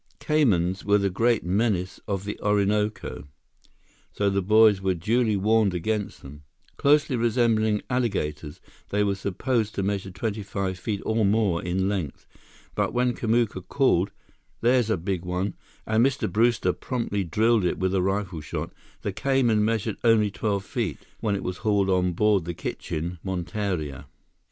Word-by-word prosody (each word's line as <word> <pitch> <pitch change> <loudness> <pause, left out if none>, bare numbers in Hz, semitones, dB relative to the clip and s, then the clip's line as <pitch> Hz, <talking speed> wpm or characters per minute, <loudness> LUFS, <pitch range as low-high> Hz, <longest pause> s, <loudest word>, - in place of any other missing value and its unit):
Caymans 95 - +1
were 100 0 +4
the 100 -1 0
great 115 +4 +2
menace 95 -1 0
of 100 -1 -2
the 105 - -5
Orinoco, 105 -3 0 0.9
so 100 -1 0
the 100 0 +1
boys 105 0 +5
were 95 -1 +1
duly 110 +4 +1
warned 105 -1 +2
against 105 +4 -2
them. 70 +2 -11 0.3
Closely 145 -1 +3
resembling 115 -2 +2
alligators, 80 - -2 0.3
they 105 +1 +1
were 100 -1 +1
supposed 105 +4 -1
to 100 - -1
measure 100 -1 -2
twenty 105 +3 -3
five 95 -2 -3
feet 100 0 -3
or 110 0 +1
more 100 -4 +2
in 95 +2 -1
length. 95 -8 -3 0.5
But - - -1
when 125 0 +2
Kamuka 115 -4 0
called, 115 -9 +2 0.5
"There's 120 -1 +3
a 110 - +2
big 90 +1 -3
one!" 90 +2 -2 0.3
and 110 +1 +2
Mr. 135 +1 +1
Brewster 110 -5 +2
promptly 115 -6 -2
drilled 110 +5 +2
it 90 - 0
with 95 0 0
a 95 - +2
rifle 95 -3 -1
shot, - - -5 0.3
the - - -2
cayman 130 -6 +2
measured 110 -1 -1
only 110 -3 +4
twelve 100 -1 -2
feet, 115 - -2 0.2
when 105 -2 0
it 100 - -4
was 90 0 -3
hauled 100 -3 +1
on 90 -1 +2
board 100 -1 +2
the 85 -1 -4
kitchen 85 +3 -4
monteria. 90 -5 -3
100 Hz, 155 wpm, -25 LUFS, 95-115 Hz, 0.9 s, boys